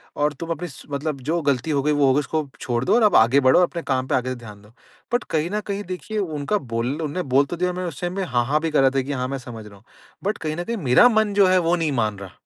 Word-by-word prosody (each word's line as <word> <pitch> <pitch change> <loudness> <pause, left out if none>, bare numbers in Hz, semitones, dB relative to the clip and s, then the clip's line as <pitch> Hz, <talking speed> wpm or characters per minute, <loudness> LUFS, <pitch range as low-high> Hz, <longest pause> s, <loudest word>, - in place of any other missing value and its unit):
और 145 0 +1
तुम 165 +4 -8
अपनी 170 +2 -3
स 145 - -12 0.2
मतलब 140 0 -3
जो 170 +1 +1
गलती 140 0 0
हो 140 -2 +1
गई 150 - +2
वो 145 -1 +3
होगी 135 +2 +4
उसको 150 +1 -2
छोड़ 120 -1 -2
दो - - +2
और 235 - +4
आप 210 - +4
आगे 120 +5 +5
बढ़ो 130 +2 +5
और - - +5
अपने 170 - -6
काम 130 -1 -1
पे - - +1
आगे 130 0 -1
से 130 - -3
ध्यान 105 -4 -12
दो। 105 - -19 0.4
बट 245 - +2
कहीं 160 +2 0
न 210 - 0
कहीं 200 0 -3
देखिए 185 +4 -6
उनका 160 +1 -1
बोल 115 - -3
उन्होंने 155 +4 -3
बोल 140 +1 +5
तो 175 - -5
दिया 180 +1 0
मैंने 180 0 -4
उस 145 -5 -8
टाइम 175 0 -2
में 195 - -1
हाँ, 120 -9 0
हाँ, 145 +5 +1
भी 165 - -2
कर 150 - +3
रहा 135 - +5
था 135 - +3
कि 135 +2 -5
हाँ 130 -2 -2
मैं 135 +1 -3
समझ 120 -5 -9
रहा 100 - -14
हूँ। 100 - -23 0.4
बट 205 +2 -1
कहीं 155 -1 -3
न 175 - -3
कहीं 230 +5 -3
मेरा 145 - +5
मन 220 -3 +1
जो 200 -1 +5
है 185 0 +4
वो 170 0 +2
नहीं 165 -3 -1
मान 110 -6 -1
रहा। 95 -2 -9
150 Hz, 315 wpm, -22 LUFS, 130-180 Hz, 0.4 s, आगे